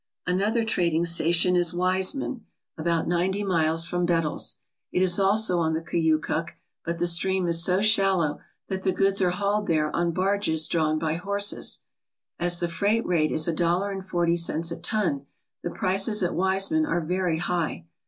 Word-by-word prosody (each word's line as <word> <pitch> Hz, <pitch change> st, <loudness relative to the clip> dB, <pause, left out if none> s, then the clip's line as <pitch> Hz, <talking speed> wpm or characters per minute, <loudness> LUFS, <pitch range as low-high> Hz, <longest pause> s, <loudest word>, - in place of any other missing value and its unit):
Another 205 Hz, +6 st, +1 dB
trading 170 Hz, -6 st, +1 dB
station 170 Hz, +1 st, +3 dB
is 175 Hz, -1 st, +1 dB
Wiseman, 185 Hz, +8 st, 0 dB, 0.3 s
about 165 Hz, 0 st, -1 dB
ninety 185 Hz, +4 st, 0 dB
miles 165 Hz, -3 st, +1 dB
from 175 Hz, +1 st, -2 dB
Bettles. 165 Hz, -3 st, 0 dB, 0.4 s
It -, -, 0 dB
is 180 Hz, 0 st, +3 dB
also 195 Hz, -2 st, +3 dB
on 160 Hz, -1 st, 0 dB
the 160 Hz, -, -2 dB
Koyukuk, 165 Hz, 0 st, -1 dB, 0.3 s
but 170 Hz, 0 st, -3 dB
the 175 Hz, -, 0 dB
stream 185 Hz, +2 st, +1 dB
is 170 Hz, 0 st, +2 dB
so 185 Hz, +3 st, +1 dB
shallow 195 Hz, -8 st, +2 dB, 0.3 s
that 190 Hz, -1 st, -4 dB
the 190 Hz, -1 st, 0 dB
goods 195 Hz, +1 st, +2 dB
are 180 Hz, -, +3 dB
hauled 200 Hz, +3 st, -1 dB
there 155 Hz, -2 st, 0 dB
on 170 Hz, 0 st, +1 dB
barges 185 Hz, -3 st, 0 dB
drawn 155 Hz, -2 st, +1 dB
by 155 Hz, 0 st, -1 dB
horses. 200 Hz, +4 st, 0 dB, 0.6 s
As 175 Hz, 0 st, 0 dB
the 175 Hz, -, -1 dB
freight 200 Hz, +6 st, 0 dB
rate 160 Hz, -4 st, +1 dB
is 155 Hz, +1 st, -1 dB
a 170 Hz, -, 0 dB
dollar 175 Hz, +4 st, 0 dB
and 195 Hz, -1 st, -5 dB
forty 175 Hz, -2 st, 0 dB
cents 165 Hz, 0 st, -1 dB
a 170 Hz, -, -4 dB
ton, 170 Hz, -6 st, -1 dB, 0.3 s
the -, -, -3 dB
prices 195 Hz, +4 st, 0 dB
at 175 Hz, -, 0 dB
Wiseman 195 Hz, -, +1 dB
are 175 Hz, -, 0 dB
very 180 Hz, 0 st, -1 dB
high. 170 Hz, -, -2 dB
175 Hz, 175 wpm, -25 LUFS, 165-195 Hz, 0.6 s, station